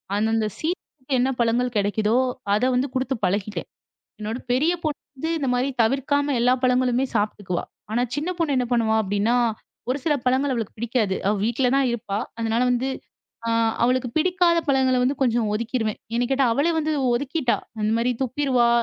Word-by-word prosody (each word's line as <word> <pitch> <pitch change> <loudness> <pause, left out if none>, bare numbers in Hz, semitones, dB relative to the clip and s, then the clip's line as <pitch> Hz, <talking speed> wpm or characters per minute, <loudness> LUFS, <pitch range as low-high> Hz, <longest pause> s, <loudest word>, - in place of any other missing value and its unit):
அந்த 210 +2 +1
அந்த 220 -1 +1
சீசன்க்கு 305 -5 -4
என்ன 255 +2 +2
பழங்கள் 240 +1 +1
கிடைக்குதோ, 210 +3 +1 0.4
அத 210 +4 +1
வந்து 255 +3 +1
கொடுத்து 260 +1 -1
பழகிட்டேன். 205 +2 -2 0.5
என்னோட 215 +3 -3
பெரிய 300 +8 +3
பொண்ணு 305 -2 -2 0.2
வந்து 320 +5 -3
இந்த 280 - -2
மாதிரி 250 +2 +1
தவிர்க்காம 280 +4 +1
எல்லா 245 +2 +4
பழங்களுமே 255 0 +2
சாப்பிட்டுக்குவா. 205 -4 -1 0.3
ஆனா 240 - +1
சின்ன 305 +5 -2
பொண்ணு 310 -5 +1
என்ன 250 - +1
பண்ணுவா 225 -2 +2
அப்படின்னா, 205 +4 +1 0.5
ஒரு 255 - +1
சில 310 - +2
பழங்கள் 265 +2 +2
அவளுக்கு 225 -4 -4
பிடிக்காது. 225 -3 0
அவ 205 - +3
வீட்ல 245 +2 +1
தான் 275 -2 +3
இருப்பா. 210 -3 -3 0.2
அதனால 225 +1 0
வந்து 250 +2 0 0.6
அ - - +1 0.3
அவளுக்கு 250 +1 +2
பிடிக்காத 350 0 +3
பழங்கள 265 -2 +3
வந்து 265 +3 +1
கொஞ்சம் 235 -4 +2
ஒதுக்கிடுவேன். 225 0 -2 0.2
என்ன 245 - +2
கேட்டா 270 0 +3
அவளே 290 +8 +2
வந்து 315 0 0 0.2
ஒதுக்கிட்டா. 270 +1 0 0.2
அந்த 215 +1 +1
மாதிரி 240 +2 +1
துப்பிடுவா 255 -2 +2
250 Hz, 165 wpm, -23 LUFS, 225-275 Hz, 0.6 s, எல்லா